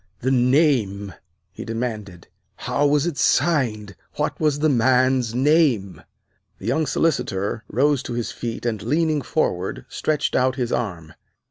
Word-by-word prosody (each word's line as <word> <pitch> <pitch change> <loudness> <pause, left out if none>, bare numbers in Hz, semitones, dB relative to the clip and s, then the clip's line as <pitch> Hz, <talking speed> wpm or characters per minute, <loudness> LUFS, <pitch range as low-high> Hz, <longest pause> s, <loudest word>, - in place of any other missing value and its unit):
"The 130 - 0
name!" 125 - +2 0.4
he - - -8
demanded. 110 -6 -5 0.3
"How 135 +4 0
was 145 +1 +2
it 170 -4 -3
signed? 110 - +1 0.2
What - - -2
was 150 -2 +1
the 155 +2 +2
man's 130 -2 +2
name!" 130 - +2 0.6
The - - -11
young 160 -1 0
Solicitor 115 -9 -1
rose 140 +3 +1
to 120 - -4
his 120 -1 -3
feet 120 0 -6
and, 110 -4 -1
leaning 155 +5 +1
forward, 95 - -2
stretched 150 -1 -1
out 130 0 +2
his 125 -3 -2
arm. 85 -9 -3
125 Hz, 140 wpm, -22 LUFS, 110-145 Hz, 0.6 s, name